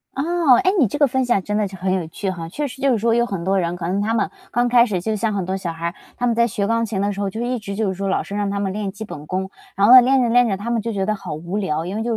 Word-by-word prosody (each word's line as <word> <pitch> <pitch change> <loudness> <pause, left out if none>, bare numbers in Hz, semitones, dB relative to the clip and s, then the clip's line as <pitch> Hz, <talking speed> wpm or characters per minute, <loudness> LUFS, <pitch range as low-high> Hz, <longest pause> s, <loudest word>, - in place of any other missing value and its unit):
哦， 320 -1 +3
诶， 375 - +4
你 265 - +5
这 205 - -4
个 295 - +5
分 260 0 0
享 240 -5 +1
真 210 - -3
的 210 -1 +1
是 190 - -10
很 185 0 -1
有 180 -4 -2
趣 190 +4 -4
哈。 165 -3 -7
确 290 - -3
实 265 +1 -11
就 275 0 +3
是 240 - +2
说 225 +2 +1
有 235 +1 +3
很 190 -6 -4
多 195 +2 +1
人， 170 -1 -1
可 175 -1 -5
能 190 +3 0
他 220 +2 0
们 - - 0 0.2
刚 240 +1 +1
开 240 0 +6
始 200 -6 -2
就 215 +5 -2
像 220 +1 -1
很 195 -3 -2
多 190 +1 -2
小 185 -3 -4
孩 165 0 -7
儿， 170 - -5 0.2
他 245 - -1
们 235 -2 +1
在 235 0 +3
学 200 -2 -2
钢 230 +2 +1
琴 210 -3 -3
的 205 +1 0
时 200 - -5
候 200 - -1
就 220 - -7
一 245 +1 -1
直 200 -2 -6
就 215 0 0
是 - - -2
说 195 +1 -4
老 - - 0
师 200 - -7
让 205 -1 -1
他 200 0 -2
们 195 -1 -2
练 205 -1 -3
基 215 +3 -8
本 150 -7 -9
功。 190 +2 -3 0.2
然 200 +1 +3
后 240 - +8
呢， 255 - +11
练 265 +2 +3
着 240 - +1
练 245 +1 +4
着， 195 -3 -1
他 220 +4 -4
们 235 -1 0
就 230 +2 -3
觉 195 -3 -1
得 215 - +1
好 195 -6 -6
无 170 +6 -5
聊， 160 -6 -1
因 185 +3 -4
为 220 - -2
就 235 - -2
205 Hz, 390 characters per minute, -21 LUFS, 190-235 Hz, 0.2 s, 呢